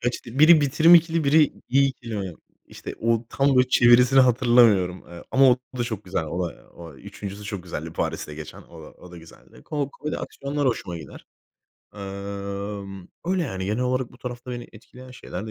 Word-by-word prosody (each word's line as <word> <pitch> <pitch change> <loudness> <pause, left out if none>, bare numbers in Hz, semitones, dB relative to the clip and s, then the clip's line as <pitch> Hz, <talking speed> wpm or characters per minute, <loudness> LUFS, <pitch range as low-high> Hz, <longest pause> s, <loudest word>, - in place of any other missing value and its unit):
Kaç 120 0 -3
dil? 120 +2 -8
Biri, 155 +1 +7
"Bitirim 150 +4 +5
İkili" 165 -1 +3
biri, 150 +2 +4 0.2
"İyi 135 +2 +4
İkili" 115 -4 -7
mi? 95 -3 -4 0.3
İşte, - - -9
o 115 0 0
tam 135 -1 +1
böyle 125 0 +4
çevirisini 125 +2 +5
hatırlamıyorum. 120 -7 +3
Eee, 85 0 -11
ama 135 0 +5
o 125 - +4 0.2
da 120 - 0
çok 110 -3 -5
güzel. 90 -3 -2
O 85 +3 -3
da - - -16
o 85 -3 -11
3.'sü 100 +8 -9
çok 100 -3 -5
güzeldi, 80 -2 -7
Paris'te 75 - -4
geçen. 75 -1 -10
O 80 -1 -14
da, - - -11
o 90 - -16
da 90 - -12
güzeldi. 80 0 -17
Ko 145 -2 -3
komedi 150 +2 -5
aksiyonlar 140 +1 -4
hoşuma 95 -8 -2
gider. 75 - -12 0.7
Emm, 100 -1 -7 0.2
öyle, 185 -1 +1
yani, 95 -10 -4
genel 105 +4 -1
olarak 125 -1 -1
bu 120 - -17
tarafta 125 0 -7
beni 120 -1 -7
etkileyen 125 +3 -14
şeyler 110 -5 -8
de - - -7
120 Hz, 195 wpm, -24 LUFS, 95-130 Hz, 0.7 s, Biri